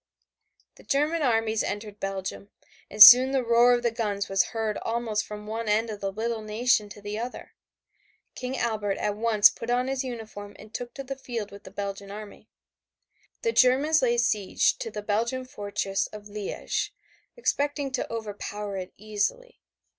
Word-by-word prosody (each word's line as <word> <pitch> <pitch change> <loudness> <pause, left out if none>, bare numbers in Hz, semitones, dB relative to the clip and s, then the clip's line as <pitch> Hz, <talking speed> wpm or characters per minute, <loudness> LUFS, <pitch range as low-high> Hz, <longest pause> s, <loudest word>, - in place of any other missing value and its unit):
The - - -16
German 300 +4 0
armies 225 -4 +1
entered 205 0 -5
Belgium, 195 0 -5 0.4
and 210 0 +10
soon 255 +2 +10
the 265 -2 +1
roar 235 +1 +5
of 240 0 0
the 235 - +2
guns 205 -3 -2
was 195 -1 +3
heard 220 -2 -3
almost 225 -2 -1
from 210 0 -9
one 220 +1 -4
end 220 +2 +1
of 210 - -8
the 195 -1 -2
little 225 +2 -3
nation 215 0 +1
to 205 0 -12
the 205 +1 -4
other. 245 +2 -7 0.8
King 260 +1 -5
Albert 210 -4 -1
at 210 -1 -1
once 215 -1 +5
put 230 - -8
on 250 +1 +1
his 270 0 -1
uniform 220 -5 -8
and 215 - -14
took 245 -1 -6
to 275 - -6
the 270 +1 -5
field 235 -6 -5
with 200 - -13
the - - -9
Belgian 200 0 -6
army. 210 +1 -10 0.9
The 460 - +2
Germans 280 - +4
laid 240 -2 +2
siege 210 -5 +1
to - - -4
the 210 -1 -6
Belgian 235 +5 -1
fortress 200 -4 -2
of 210 -1 -10
Liège, 205 -1 -4 0.5
expecting 285 - -1
to 260 - -3
overpower 205 -2 -5
it 185 -1 -6
easily. 215 - -3
220 Hz, 170 wpm, -26 LUFS, 205-245 Hz, 0.9 s, and